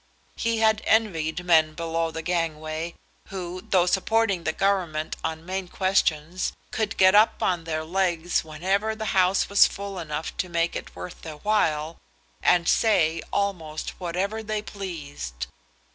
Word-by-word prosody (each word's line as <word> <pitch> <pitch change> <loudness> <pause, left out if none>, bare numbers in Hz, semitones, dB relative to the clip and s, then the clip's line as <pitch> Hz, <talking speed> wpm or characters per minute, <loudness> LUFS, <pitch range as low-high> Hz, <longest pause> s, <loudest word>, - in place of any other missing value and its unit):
He 230 0 0
had 220 -1 +3
envied 180 -6 +1
men 160 -3 +4
below 165 0 -1
the 160 0 -6
gangway, 160 -1 -2 0.3
who, 185 -2 -5
though 180 -2 +4
supporting 195 0 +1
the 160 - +2
Government 175 -5 0
on 160 0 -3
main 190 0 -3
questions, 180 -2 0 0.2
could 220 -1 -2
get 185 0 +6
up 210 +2 +4
on 175 -3 0
their 155 -1 -2
legs 175 0 0
whenever 190 +8 -1
the 220 -1 -3
House 185 0 +3
was 200 - +6
full 200 -1 -6
enough 155 -1 -4
to 185 - -2
make 170 0 0
it - - -6
worth 180 - -8
their 160 -2 -7
while, 160 -5 0 0.4
and 170 -2 +3
say 170 -8 +3
almost 170 -6 -2
whatever 190 +5 -2
they 215 -1 -3
pleased. 145 - -6
175 Hz, 145 wpm, -25 LUFS, 160-200 Hz, 0.4 s, get